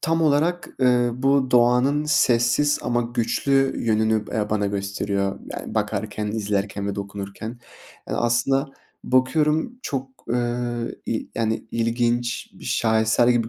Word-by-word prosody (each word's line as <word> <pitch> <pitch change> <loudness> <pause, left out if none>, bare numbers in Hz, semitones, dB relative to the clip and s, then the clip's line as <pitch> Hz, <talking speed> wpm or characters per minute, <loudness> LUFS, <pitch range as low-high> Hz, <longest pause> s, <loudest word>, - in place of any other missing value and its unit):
tam 165 +1 +1
olarak, 160 +4 +2
ııı, 125 0 +2
bu 135 -1 +3
doğanın 125 +4 +4
sessiz 145 -1 +3
ama 120 0 +1
güçlü 125 +3 +1
yönünü 110 -1 +2
b - - -9
eee, 105 -1 -1
bana 105 -1 +1
gösteriyor, 100 0 -2
yani - - -6
bakarken, 105 +1 -2
izlerken 100 -1 -2
ve 100 - -2
dokunurken. 100 +2 -6 0.6
Eee, - - -2
aslında 135 +4 +1 0.4
bakıyorum 150 - +1
çok, 135 -2 -3 0.2
ııı, 120 0 -2
y 110 - -2
yani, 110 -1 +1
ı - - -7
ilginç 120 +1 0
bir - - -14
şaheser 110 +1 +2
gibi 120 -2 +2
120 Hz, 135 wpm, -23 LUFS, 110-130 Hz, 0.6 s, doğanın